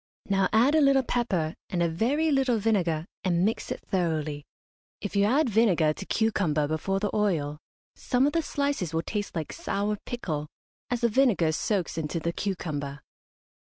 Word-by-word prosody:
Now 195 Hz, -2 st, +2 dB
add 240 Hz, +7 st, +4 dB
a 315 Hz, -, +5 dB
little 275 Hz, -2 st, +5 dB
pepper, 190 Hz, -11 st, 0 dB, 0.2 s
and 175 Hz, -2 st, 0 dB
a -, -, +3 dB
very 260 Hz, -, +1 dB
little 265 Hz, -4 st, +2 dB
vinegar, 180 Hz, -7 st, +1 dB, 0.2 s
and 180 Hz, -1 st, +2 dB
mix 220 Hz, -, -2 dB
it -, -, -4 dB
thoroughly. 155 Hz, -6 st, -1 dB, 0.5 s
If 205 Hz, -, -5 dB
you 200 Hz, 0 st, +4 dB
add 275 Hz, +7 st, +3 dB
vinegar 190 Hz, -9 st, +3 dB
to 195 Hz, -, -8 dB
cucumber 180 Hz, -10 st, +1 dB
before 160 Hz, +6 st, -1 dB
the 205 Hz, 0 st, -2 dB
oil 160 Hz, -9 st, 0 dB, 0.3 s
some 255 Hz, +1 st, +1 dB
of 290 Hz, -, +1 dB
the 335 Hz, -, +2 dB
slices 280 Hz, -, -2 dB
will 165 Hz, -, 0 dB
taste 205 Hz, -2 st, -4 dB
like 160 Hz, -3 st, -3 dB
sour 210 Hz, -, -2 dB
pickle, 155 Hz, -11 st, -3 dB, 0.4 s
as 245 Hz, -1 st, -1 dB
the 235 Hz, -, +4 dB
vinegar 215 Hz, -9 st, +3 dB
soaks 180 Hz, 0 st, -1 dB
into 160 Hz, +2 st, -2 dB
the 170 Hz, +1 st, -2 dB
cucumber. 150 Hz, -8 st, -3 dB
195 Hz, 170 wpm, -27 LUFS, 160-235 Hz, 0.5 s, a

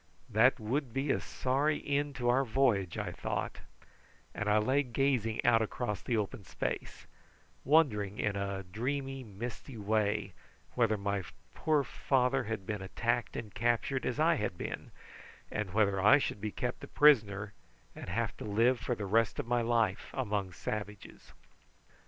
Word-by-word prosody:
"That -, -, +5 dB
would 125 Hz, +3 st, -2 dB
be 135 Hz, +1 st, +1 dB
a -, -, +1 dB
sorry 140 Hz, +4 st, 0 dB
end 145 Hz, 0 st, 0 dB
to 125 Hz, -1 st, -2 dB
our 125 Hz, +3 st, +4 dB
voyage," 110 Hz, -8 st, +1 dB
I -, -, -3 dB
thought, -, -, -3 dB, 0.7 s
and 105 Hz, -, -2 dB
I 105 Hz, -, +4 dB
lay 130 Hz, +7 st, +3 dB
gazing 125 Hz, -4 st, 0 dB
out 115 Hz, -1 st, +5 dB
across 110 Hz, -1 st, -2 dB
the 120 Hz, -, -1 dB
open 105 Hz, 0 st, -3 dB
space, -, -, -4 dB, 0.6 s
wondering 105 Hz, -10 st, +3 dB
in 105 Hz, -2 st, 0 dB
a 100 Hz, -1 st, -3 dB
dreamy 135 Hz, +7 st, -3 dB
misty 115 Hz, +4 st, -7 dB
way 105 Hz, 0 st, 0 dB, 0.4 s
whether 115 Hz, -3 st, +2 dB
my 100 Hz, 0 st, -1 dB, 0.3 s
poor 155 Hz, -3 st, +2 dB
father 130 Hz, -1 st, +1 dB
had 105 Hz, -3 st, -4 dB
been 105 Hz, -1 st, -3 dB
attacked 120 Hz, +5 st, -1 dB
and 105 Hz, -3 st, -6 dB
captured 120 Hz, +3 st, 0 dB
as 125 Hz, +3 st, -2 dB
I 165 Hz, +1 st, +4 dB
had 105 Hz, -6 st, -2 dB
been, -, -, -5 dB, 0.6 s
and 105 Hz, -3 st, -3 dB
whether 100 Hz, -1 st, +2 dB
I 105 Hz, +7 st, +7 dB
should 105 Hz, -7 st, -3 dB
be 105 Hz, 0 st, -2 dB
kept 125 Hz, +2 st, -4 dB
a -, -, -6 dB
prisoner, 105 Hz, -8 st, +4 dB, 0.4 s
and -, -, -8 dB
have 110 Hz, +4 st, -1 dB
to -, -, -7 dB
live 115 Hz, +4 st, +2 dB
for 125 Hz, -, -2 dB
the 105 Hz, -, -4 dB
rest 115 Hz, +3 st, +2 dB
of -, -, -2 dB
my 120 Hz, 0 st, +1 dB
life 115 Hz, -4 st, +1 dB
among 105 Hz, -7 st, -1 dB
savages. 105 Hz, +2 st, -6 dB
115 Hz, 160 wpm, -32 LUFS, 105-130 Hz, 0.7 s, I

